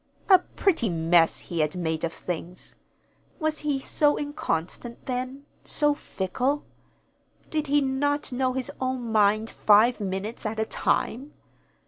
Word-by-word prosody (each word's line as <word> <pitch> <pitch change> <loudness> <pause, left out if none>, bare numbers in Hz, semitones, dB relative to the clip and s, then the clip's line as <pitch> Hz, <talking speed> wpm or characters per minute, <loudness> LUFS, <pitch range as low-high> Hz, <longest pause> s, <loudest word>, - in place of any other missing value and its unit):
A 375 -2 +9
pretty 340 - 0
mess 165 0 +3
he 170 - -5
had 155 +1 +1
made 160 -3 -2
of 165 - 0
things! 175 +1 -6 0.6
Was 310 -2 -1
he 295 -2 -1
so 290 +2 +2
inconstant 240 - -4
then, 255 +2 -4 0.2
so 295 -1 +2
fickle? 265 +3 -2 0.9
Did 310 -1 -1
he 290 +1 +3
not 285 +2 0
know 255 0 0
his 260 -1 -3
own 255 -3 -2
mind 215 +1 +3
five 220 +4 +4
minutes 200 +3 -4
at 220 0 -3
a 220 - +1
time? 265 +5 -1
250 Hz, 135 wpm, -26 LUFS, 190-285 Hz, 0.9 s, A